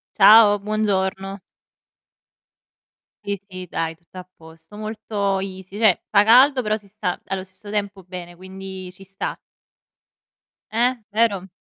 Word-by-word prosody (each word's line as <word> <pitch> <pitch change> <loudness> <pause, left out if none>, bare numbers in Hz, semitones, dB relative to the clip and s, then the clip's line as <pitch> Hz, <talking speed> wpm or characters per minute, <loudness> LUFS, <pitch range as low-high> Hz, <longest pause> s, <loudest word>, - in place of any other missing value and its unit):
Ciao, 210 0 +8
buongiorno. 195 -2 -1 1.8
Sì, 200 0 -2
sì, 185 -1 -8
dai, 165 0 -2
tutto 170 +3 -15
a 180 - -10
posto. 160 +4 -16
Molto 215 -2 -2
easy, 190 0 -7
cioè, 215 -5 +3
fa 205 0 +5
caldo 255 +5 +6
però 215 -3 0
si 205 -2 -14
sta 195 -3 -3
allo 190 -1 -3
stesso 190 +2 -13
tempo 200 -2 -3
bene, 180 -1 -9
quindi 190 0 -9
ci 190 +1 -15
sta. 195 0 -5 1.3
Eh, 245 +3 +2 0.2
vero? 210 -4 +1
195 Hz, 130 wpm, -22 LUFS, 185-215 Hz, 1.8 s, Ciao